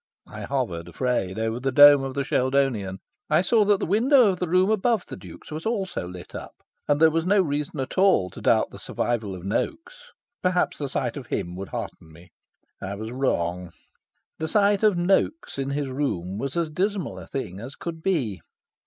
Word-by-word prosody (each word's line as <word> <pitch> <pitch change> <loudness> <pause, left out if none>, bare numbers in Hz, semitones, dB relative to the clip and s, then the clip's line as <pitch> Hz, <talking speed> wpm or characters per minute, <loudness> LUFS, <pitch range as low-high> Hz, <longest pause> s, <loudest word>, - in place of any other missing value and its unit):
I - - -9
hovered, 110 -12 -2
afraid, 95 -1 -1
over 110 +1 -1
the 135 +1 -1
dome 145 +1 +8
of 135 -1 -5
the 140 - 0
Sheldonian. 130 -8 0 0.3
I 155 +3 +4
saw 225 +1 +4
that 205 -1 +3
the - - -1
window 240 - +5
of 180 - -5
the 180 - -1
room 185 +4 +3
above 220 0 +1
the - - -8
Duke's - - -12
was 155 +1 -5
also 195 - -2
lit 90 0 -10
up. - - -8 0.3
And 145 0 +2
there 160 0 +6
was 165 +1 0
no 200 +4 +3
reason 145 -2 -3
at 130 +7 -3
all 185 - +4
to - - -10
doubt - - +2
the - - -11
survival 110 -5 -2
of 90 - -10
Noaks. 330 - -4 0.3
Perhaps 180 -1 +1
the 140 -2 -3
sight 130 0 -2
of 135 - -8
him 85 +1 -3
would 95 +1 -7
hearten 80 - -7
me. 85 +2 -17 0.5
I 95 +1 -4
was 110 +2 -6
wrong. 90 -9 -1 0.7
The 160 - -2
sight 200 +3 +3
of 210 -4 +4
Noaks 190 - 0
in 135 0 -2
his 140 0 -2
room 105 -9 -2
was 140 +5 -3
as 165 -2 0
dismal 190 +1 -2
a - - -11
thing 95 -8 -5
as 125 +6 -8
could 165 -1 -6
be. 130 - -1
140 Hz, 200 wpm, -25 LUFS, 110-185 Hz, 0.7 s, dome